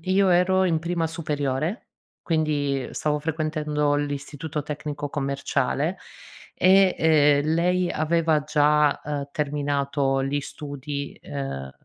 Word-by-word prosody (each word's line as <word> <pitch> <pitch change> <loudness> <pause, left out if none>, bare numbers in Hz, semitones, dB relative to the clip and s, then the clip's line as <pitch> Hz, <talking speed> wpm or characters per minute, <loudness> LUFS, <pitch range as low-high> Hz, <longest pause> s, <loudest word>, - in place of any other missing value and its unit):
io 190 +1 +3
ero 185 +1 +3
in 165 -3 +2
prima 170 0 -1
superiore, 155 - -3 0.3
quindi 145 -4 0
stavo 150 -1 0
frequentando 150 -2 -1
l'Istituto 145 +1 -4
tecnico 145 -1 -5
commerciale 140 +4 -1 0.6
e, 190 0 +5
ehm, 150 -1 +4
lei 180 +1 +1
aveva 160 0 +1
già, 150 -1 +3
uhm 145 -1 -3
terminato 140 -2 0
gli 145 +1 -1
studi, 140 0 -6
uhm, 135 - -5
150 Hz, 105 wpm, -24 LUFS, 145-160 Hz, 0.6 s, e